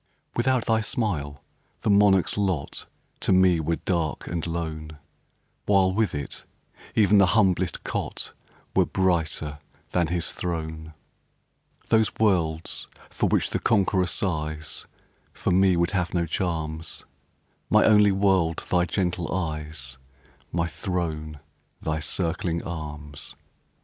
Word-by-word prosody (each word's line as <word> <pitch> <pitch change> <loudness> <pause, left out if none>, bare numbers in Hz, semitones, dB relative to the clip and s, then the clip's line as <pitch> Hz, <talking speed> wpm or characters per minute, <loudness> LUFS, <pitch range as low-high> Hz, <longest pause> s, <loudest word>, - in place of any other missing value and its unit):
Without 130 0 +2
thy 110 -1 +2
smile, 80 - -2 0.4
the - - 0
monarch's 100 -2 +4
lot 95 -8 -2 0.3
To - - 0
me 95 -2 +5
were 80 +1 0
dark 85 -3 -1
and 85 -1 -3
lone, 80 -2 -4 0.7
While, 95 -2 +4
with 105 -5 +1
it, 70 -1 -5 0.5
even 105 -1 +5
the 100 - +6
humblest 95 -4 +2
cot - - -4 0.4
Were - - +4
brighter 80 -5 0 0.3
than 85 -2 +2
his 85 0 -1
throne. 80 -2 -4 0.9
Those 110 -2 +4
worlds 85 -7 +1 0.2
for - - 0
which - - +1
the - - 0
conqueror 95 -4 +2
sighs 80 -4 -3 0.5
For - - -1
me 95 0 +4
would 85 0 +2
have 90 -2 -1
no 85 -1 +2
charms; 80 -2 -3 0.6
My - - +5
only 105 -1 +6
world 95 -4 +2
thy 90 -1 +4
gentle 90 -1 -1
eyes 75 -6 -4 0.5
My 85 0 +1
throne 80 -4 -3 0.4
thy 80 0 -2
circling 85 +1 -2
arms! 75 -3 -7
85 Hz, 120 wpm, -26 LUFS, 80-95 Hz, 0.9 s, the